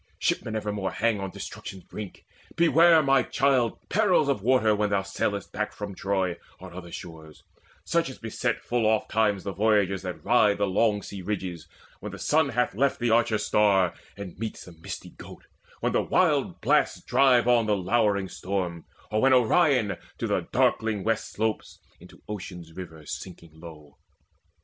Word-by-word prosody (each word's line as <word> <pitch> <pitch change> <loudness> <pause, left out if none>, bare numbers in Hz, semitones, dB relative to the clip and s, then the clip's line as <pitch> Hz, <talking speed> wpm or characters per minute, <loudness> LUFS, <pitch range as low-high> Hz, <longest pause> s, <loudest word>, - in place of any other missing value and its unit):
Shipmen 110 - -1
evermore 105 -2 -2
Hang 115 -2 +1
on 95 0 -4
destruction's 95 0 -8
brink. 105 -3 -9 0.3
Beware, 165 -1 +5
my 135 -1 +4
child, 130 -3 +1
Perils 185 -8 +2
of 135 -8 0
waters 110 -2 +3
when 105 0 0
thou 100 -1 +1
sailest 100 +1 -3
back 105 0 -3
From 105 -1 -6
Troy 95 -2 -1 0.2
or 95 -1 -11
other 85 -1 -9
shores, 80 -3 -10 0.4
such - - +1
as - - -9
beset - - -2
Full 120 -2 0
oftentimes 110 -2 +1
the 100 - -4
voyagers 100 -1 +2
that 90 -2 -7
ride 105 -4 +4
The 105 - +1
long 105 +1 +1
sea 100 -1 -7
ridges, 90 -4 -4 0.3
when - - -7
the - - -7
sun 155 -1 +2
hath 125 -1 0
left 135 +6 +1
The 120 -2 +1
Archer 115 -1 +3
star, 100 -5 +2 0.2
and 95 -3 -8
meets 110 -1 -5
the 90 - -12
misty 80 -1 -9
Goat, - - -13 0.4
When - - 0
the - - +3
wild - - +1
blasts - - +2
drive 125 -1 +4
on 120 -2 +4
the 105 -1 +2
lowering 100 0 +1
storm, 90 -3 -4 0.3
Or 110 0 +1
when 135 0 +5
Orion 125 - +3 0.2
to - - -3
the - - -1
darkling 110 -3 +1
west 110 +1 -1
Slopes, 110 0 -3 0.2
into - - -17
Ocean's 90 -5 -7
river 80 -4 -9
sinking 85 0 -8
slow. 80 -2 -13
105 Hz, 170 wpm, -26 LUFS, 95-115 Hz, 0.4 s, Beware